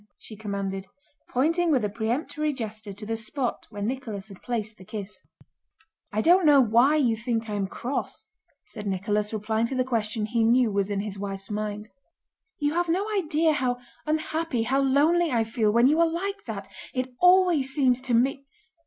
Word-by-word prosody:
she 215 - -10
commanded, 195 -2 -4 0.4
pointing 330 +7 +2
with 260 -8 +2
a - - +2
peremptory 280 +8 -2
gesture 220 -5 -6
to 205 +2 -8
the 225 +1 -2
spot 240 +3 -3
where 205 -2 -6
Nicholas 220 -4 -4
had 195 - -13
placed 220 -3 -3
the - - -11
kiss. 205 +1 -7 0.9
"I 215 - 0
don't 355 +8 +5
know 295 -3 +7
why 245 +4 +4
you 250 -7 +2
think 230 0 -2
I 210 - -4
am 200 -2 -1
cross," 250 +7 -4 0.4
said 210 -2 -8
Nicholas, 205 +2 -1
replying 220 +1 0
to 265 - -4
the 255 - +2
question 220 -3 -1
he 230 +1 0
knew 235 0 +4
was 200 0 0
in 200 -1 -1
his 200 -1 -6
wife's 195 0 -5
mind. 210 0 -3 0.7
"You 295 0 0
have 350 0 0
no 370 +5 +1
idea 320 -3 +2
how 255 -3 0 0.3
unhappy, 310 -4 -1
how 265 +4 +1
lonely, 305 +5 +3
I 230 -2 +2
feel 225 -1 +1
when 235 +3 +4
you 300 +5 +4
are 335 - +5
like 395 +5 -4
that. - - -6 0.3
It 255 0 -2
always 360 -7 +5
seems 260 -3 +2
to 250 -2 0
me..." 270 +3 +1
235 Hz, 185 wpm, -26 LUFS, 210-290 Hz, 0.9 s, know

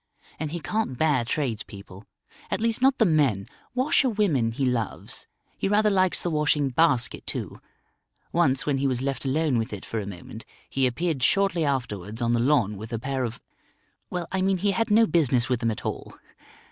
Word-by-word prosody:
And 155 -1 -2
he 170 - -3
can't 170 - -2
bear 145 -5 +2
tradespeople; 110 -7 -4 0.4
at - - -1
least 230 +1 0
not 265 0 +4
the 225 - +4
men. 140 - +2 0.3
Washer 260 +1 +3
women 170 - +1
he 135 +4 -1
loves. 120 -4 -3 0.3
He - - 0
rather 210 +1 +3
likes 185 -2 +3
the 175 - -1
washing 150 -2 +2
basket 130 -3 +2
too. - - -5 0.7
Once, 135 -6 +2
when 140 -2 0
he 140 - +1
was 130 -1 -1
left 135 -1 -2
alone 140 -2 +1
with 110 - -3
it 100 -2 -6
for 115 - -3
a 100 - -5
moment, 100 +4 -9 0.2
he 135 -1 +1
appeared 155 +2 -1
shortly 195 +3 +2
afterwards 115 -7 -2
on 120 -1 +1
the 120 - +2
lawn 120 -6 +2
with 110 +4 -8
a 115 - -1
pair 130 +2 -2
of 115 -1 -4 0.7
well, 180 -1 -3
I 190 - 0
mean 190 0 +2
he 200 +3 +1
had 225 +4 0
no 220 +2 +6
business 130 - +2
with 125 -2 +1
them 115 -2 0
at 110 - -5
all. - - -5
135 Hz, 195 wpm, -25 LUFS, 115-175 Hz, 0.7 s, no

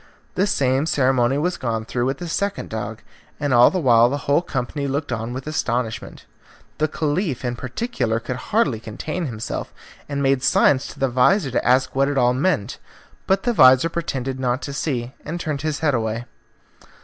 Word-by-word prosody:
The 195 +3 +1
same 135 -3 +1
ceremony 130 -3 +2
was 175 +4 -1
gone 115 -3 -2
through 120 +2 -1
with 135 +1 -1
the 175 - -6
second 200 +4 -2
dog, 110 0 -5 0.4
and 145 -3 0
all 120 0 +7
the 190 - -2
while 120 -7 +5
the 145 +2 -4
whole 145 +4 +3
company 140 -2 -3
looked 140 +1 -2
on 115 0 -3
with 130 +1 -6
astonishment. 125 -7 -3 0.5
The 155 - +2
Caliph 150 - -2
in 120 0 -1
particular 125 - -2
could 125 +2 -5
hardly 200 - +2
contain 155 +10 -4
himself, 115 -3 -5 0.4
and 140 -1 -2
made 135 -1 +2
signs 130 +1 +3
to - - -11
the 135 - +2
vizir 130 +6 +3
to - - 0
ask 130 +1 +2
what 135 +1 +3
it 145 - -2
all 125 -1 +4
meant. 130 - 0 0.5
But 190 0 +2
the 240 - +1
vizir 130 - +6
pretended 135 -6 -3
not 125 +1 -1
to 140 - -5
see, 130 -4 -2
and 165 +4 -5
turned 150 -4 -3
his 155 -1 -2
head 150 -3 +2
away. 115 0 -2
135 Hz, 185 wpm, -22 LUFS, 120-155 Hz, 0.5 s, all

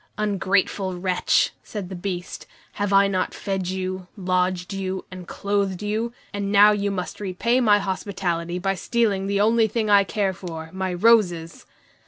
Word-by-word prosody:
"Ungrateful 195 -2 0
wretch!" 185 - +2
said 205 -4 -6
the 190 - -6
Beast. 180 -1 -5 0.2
"Have 205 0 -2
I 200 0 +5
not 185 -2 -1
fed 190 -3 -3
you, 185 0 -4
lodged 185 0 0
you, 190 -1 -3
and 185 -1 -9
clothed 200 -1 -1
you, 220 +3 -1 0.2
and 200 -1 -2
now 205 +1 +7
you 205 -1 0
must 185 -2 -4
repay 210 +6 0
my 210 -4 +5
hospitality 185 -3 -2
by 195 +2 0
stealing 195 0 0
the 200 0 0
only 225 +1 +4
thing 215 0 -1
I 200 -1 +7
care 195 -1 -1
for, 165 -3 -8
my 190 0 -2
roses?" 175 -4 +2
195 Hz, 160 wpm, -23 LUFS, 185-205 Hz, 0.2 s, now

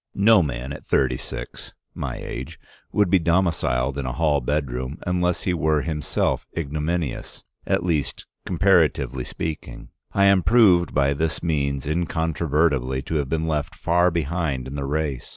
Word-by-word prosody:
No 105 0 +6
man 65 -3 -3
at - - -9
thirty - - +1
six - - -7 0.2
(my - - -4
age) 65 - -7 0.3
would 105 -4 +2
be 95 - +5
domiciled 85 -6 +1
in 65 - -3
a 60 - -2
hall 75 -1 +1
bedroom, 65 0 -2
unless 90 0 0
he 90 - 0
were 80 -3 +1
himself 75 -3 -1
ignominious, 75 -1 -3 0.2
at 85 - +1
least 80 -5 -1 0.2
comparatively 85 -7 +2
speaking. 80 +4 -6 0.2
I 100 - +2
am 100 -1 +5
proved 95 -4 +4
by 70 0 +3
this 80 +3 -2
means 70 -5 -1
incontrovertibly 75 -4 0
to 80 - -4
have 70 -3 -2
been 80 0 -1
left 75 -2 -2
far 90 +1 +2
behind 80 -5 -2
in 65 - -7
the 70 -1 -3
race. 75 -2 -2
80 Hz, 150 wpm, -23 LUFS, 70-85 Hz, 0.3 s, No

